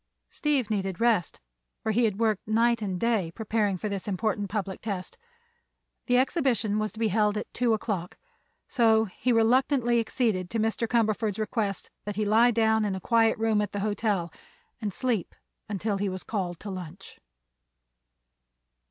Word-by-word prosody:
Steve 275 -7 0
needed 195 -3 -2
rest, 230 -7 +1 0.4
for 220 - 0
he 235 +2 +3
had 210 -2 -1
worked 220 -4 0
night 230 +1 +2
and 190 -4 -2
day 220 -7 +1
preparing 210 -3 0
for 210 - -3
this 200 -1 -4
important 205 +1 -1
public 195 -3 -3
test. 195 -4 -5 0.9
The 245 -1 +4
exhibition 250 - +1
was 215 0 -1
to 220 - -10
be 225 -1 +2
held 210 +1 +2
at 210 - -6
two 235 -2 +2
o'clock, 195 -5 -4 0.5
so 225 -3 +3
he 220 +5 -2
reluctantly 240 +1 +3
acceded 220 -6 0
to 225 - -2
Mr. 225 +1 0
Cumberford's 220 -3 +1
request 215 -3 -2
that 205 -1 -4
he 215 +1 0
lie 225 +4 +5
down 220 -1 +2
in 200 -2 -1
a - - -4
quiet 225 +2 +3
room 220 -1 +2
at 205 -1 -3
the 205 - -2
hotel 205 -5 -1 0.5
and 210 -2 -2
sleep 230 -4 -2 0.3
until 205 0 -1
he 200 0 0
was 185 0 -5
called 180 -6 -3
to 205 - -6
lunch. 185 0 -9
215 Hz, 165 wpm, -27 LUFS, 200-230 Hz, 0.9 s, lie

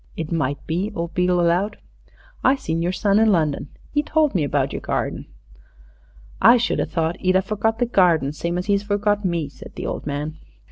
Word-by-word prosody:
"It 160 -1 -4
might 145 -4 0
be," 180 +6 -2
old 170 0 -4
Beale 180 0 +2
allowed. 175 +4 +1 0.7
"I 260 - +5
seen 165 -11 -3
your 175 +2 0
son 200 +2 +2
in 220 -1 +4
London. 150 -5 0 0.2
'E 295 - +3
told 305 -1 +1
me 175 -6 +1
about 140 -1 0
yer - - -3
garden." - - -3 1.1
"I 235 +2 +8
should 240 - 0
a - - 0
thought 165 0 -1
'e'd 185 0 +2
a 190 - +5
forgot 215 +3 -1
the 245 - +1
garden 170 - +3
same 170 +3 -3
as 180 - -3
'e's 200 -1 +2
forgot 205 0 0
me," 170 -5 -1
said 140 - -13
the - - -5
old - - -4
man. 150 +2 -4
180 Hz, 200 wpm, -22 LUFS, 160-205 Hz, 1.1 s, I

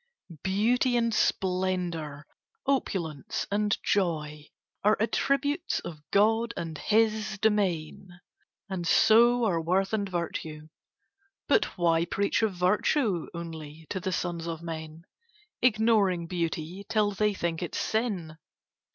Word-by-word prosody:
Beauty 240 +6 +2
and 230 -1 +1
splendour, 180 -7 -1 0.4
opulence 175 - -1
and 205 0 +1
joy, 150 -6 -1 0.4
Are 210 +1 +4
attributes 275 +7 0
of 155 -3 -8
God 225 +3 +2
and 165 -2 -4
His 215 +3 +1
domain, 185 -4 -1 0.5
And 185 -4 -4
so 235 +6 +5
are 170 -6 +1
worth 190 +5 0
and 200 -2 0
virtue. 160 -3 -4 0.8
But - - +4
why 170 -1 +2
preach 200 +5 0
Of 220 -3 +1
virtue 185 - +1
only 160 -2 -8
to 190 - -1
the 185 +1 -3
sons 170 -2 -3
of 165 0 -5
men, 160 -1 -7 0.6
Ignoring 215 -7 +3
beauty, 170 +1 -3
till 210 -2 +2
they 210 +1 0
think 170 -2 -2
it 175 - -4
sin? 190 -9 -2
185 Hz, 115 wpm, -28 LUFS, 165-215 Hz, 0.8 s, so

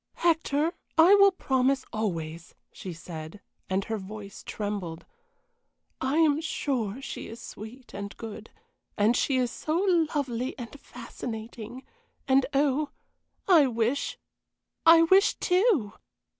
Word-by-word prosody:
"Hector, 325 -1 +1 0.2
I 335 +5 +8
will 395 -1 +7
promise 265 -5 +1
always," 165 -6 -4 0.2
she 185 - -7
said, 165 +1 -8 0.3
and 190 +1 0
her 220 -1 -3
voice 200 0 -9
trembled. 200 -6 -4 1.0
"I 265 +4 0
am 310 -2 +4
sure 260 -8 -2
she - - -6
is 225 - -9
sweet 235 +5 -10
and 200 0 -6
good; 225 -1 -8 0.5
and 215 +4 +3
she 265 +2 +1
is 250 -2 +1
so 310 +1 -2 0.4
lovely 255 -3 -2
and 250 +3 -8
fascinating 230 -1 -8 0.4
and 265 -1 +4
oh, 285 +1 +1 0.6
I 330 -7 +6
wish 235 +3 -1 0.7
I 330 0 +9
wish 380 +4 +5
too!" 360 - +2
250 Hz, 120 wpm, -27 LUFS, 210-295 Hz, 1.0 s, I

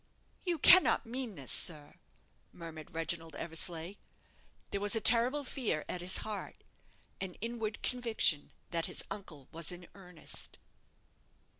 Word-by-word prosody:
"You 350 -3 -1
cannot 355 -2 +6
mean 240 -2 -4
this, 135 -4 -1
sir?" 150 -4 +3 0.5
murmured 160 -2 -10
Reginald 165 -1 -2
Eversleigh. 165 +3 -2 0.7
There 200 - -3
was 205 +2 +4
a - - +2
terrible 245 +7 +4
fear 235 - -3
at 180 - -4
his 180 +1 +3
heart 210 -2 -7 0.6
an 190 -2 -5
inward 225 -1 -5
conviction 230 - +2 0.2
that 165 -1 -1
his - - -2
uncle 155 -9 -8
was 165 +1 -2
in 175 0 -9
earnest. 180 -4 -5
185 Hz, 130 wpm, -32 LUFS, 165-230 Hz, 0.7 s, cannot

